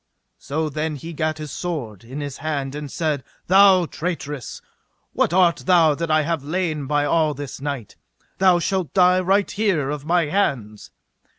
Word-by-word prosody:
So 155 +3 -2
then 155 +1 -3
he 165 +4 -8
gat 155 0 -1
his 155 -2 -7
sword 130 - -5
in 130 +6 -7
his 140 -2 -5
hand 140 -3 -3
and 145 -2 -6
said: 155 -5 -1 0.2
Thou 190 -1 +6
traitress, 155 -5 -5 0.5
what - - +1
art 175 -1 +4
thou 170 -4 +5
that 165 +3 -4
I 155 0 +3
have 160 -2 -2
lain 155 -2 -2
by 145 0 +1
all 155 0 +1
this 140 -1 -7
night? 140 -7 -5 0.4
thou 185 -2 +5
shalt 180 -3 -2
die 180 -1 +5
right 195 +2 +1
here 185 -10 0
of 150 -2 -5
my 170 +1 +2
hands. 135 - -2
155 Hz, 170 wpm, -22 LUFS, 145-175 Hz, 0.5 s, Thou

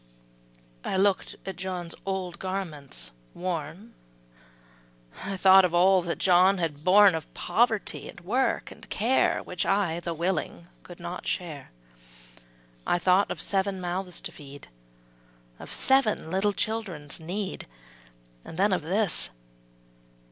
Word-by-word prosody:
''' - - -32
I - - -1
look'd 195 0 +1
at 190 -3 -5
John's 180 -2 -4
old 185 -2 -3
garments 150 - -5 0.2
worn, 180 +5 -5 1.3
I 195 0 -4
thought 190 0 +7
of 175 -1 +1
all 185 +1 +5
that 170 -1 -3
John 185 +1 +5
had 155 -4 -3
borne 195 +1 +7
Of 160 -2 -5
poverty, 225 -2 0
and - - -11
work, 245 +9 0
and - - -14
care, 240 +5 +2
Which 180 - -3
I, 195 -4 +1
though 170 -1 -4
willing, 170 0 -2
could 175 - -13
not 175 +1 -6
share; 155 -7 -3 1.2
I - - +3
thought 185 +3 +3
of - - -4
seven 195 -1 0
mouths 180 0 -3
to - - -5
feed, 140 -1 -12 0.9
Of - - -9
seven 265 -11 +2
little 200 +2 +1
children's 190 -11 -3
need, 185 +5 -4 0.8
And 165 - -10
then 195 +1 +3
of 180 - +1
this. 190 - +1
185 Hz, 135 wpm, -27 LUFS, 165-195 Hz, 1.3 s, thought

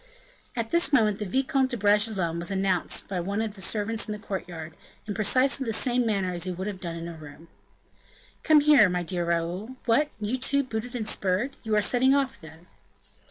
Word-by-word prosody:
At 230 -2 -3
this 340 -2 +3
moment 215 -7 +3
the 210 - -3
Vicomte 265 +4 +1
de 245 - -2
Bragelonne 205 -5 +1
was 170 - -3
announced 190 -2 0
by 190 -2 -3
one 200 +4 -2
of 220 -2 -2
the 195 - -7
servants 215 +3 0
in 210 - -3
the - - -5
courtyard, 175 -6 -6 0.3
in 210 - -4
precisely 255 +7 +2
the 225 -3 -2
same 245 +1 +1
manner 195 -4 0
as 175 0 -3
he 185 - -2
would 185 +2 -5
have 200 -3 -5
done 170 -3 -5
in 170 0 -6
a 170 - -6
room. 155 +1 -13 0.9
"Come 310 -1 +5
here, 285 -9 +6
my 180 0 -1
dear 175 +1 -2
Raoul. 170 +8 -2
What! 270 +6 +3
you, 220 +5 -2
too, 280 +2 +1
booted 245 0 -5
and 220 -3 -3
spurred? 200 +7 -1
You 220 -2 -1
are 210 - +3
setting 260 +5 +3
off, 270 -1 -1
then?" 160 +1 -13
210 Hz, 205 wpm, -26 LUFS, 180-245 Hz, 0.9 s, here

